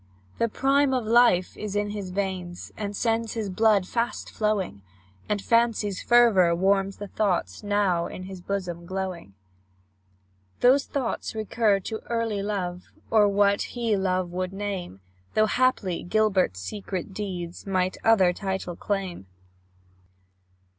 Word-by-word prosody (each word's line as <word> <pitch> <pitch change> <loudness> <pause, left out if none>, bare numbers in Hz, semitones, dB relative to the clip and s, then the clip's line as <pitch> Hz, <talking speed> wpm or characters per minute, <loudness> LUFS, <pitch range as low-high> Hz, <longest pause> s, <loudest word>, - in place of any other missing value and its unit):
The 230 - +2
prime 275 +3 +2
of 250 -3 -1
life 225 -6 +4
is 210 -1 -5
in 205 0 0
his 205 -3 -5
veins, 185 -2 -4
And 205 -1 -4
sends 225 +1 0
his 215 -4 -3
blood 205 -1 +3
fast 235 +2 -2
flowing, 210 - -1 0.5
And 210 - +1
Fancy's 230 -3 +1
fervour 215 -8 +5
warms 195 +2 +1
the 205 - -6
thoughts 195 -4 -1
Now 205 -5 +1
in 185 - -8
his 190 -1 -8
bosom 175 -3 -4
glowing. 185 - -5 1.3
Those 265 +3 +5
thoughts 255 -5 -3
recur 215 -1 +1
to 220 +3 -5
early 230 -3 -1
love, 185 -3 -3 0.3
Or 215 -2 +5
what 200 0 +3 0.2
he 230 -3 +1
love 185 -2 0
would 185 +1 -3
name, 195 - -5 0.3
Though 215 - +5
haply 215 -7 +1
Gilbert's 190 - +1
secret 190 - -5
deeds 185 -3 -5
Might 185 -1 0
other 195 -6 +5
title 190 -2 -4
claim. 190 - -3
200 Hz, 135 wpm, -26 LUFS, 185-220 Hz, 1.3 s, fervour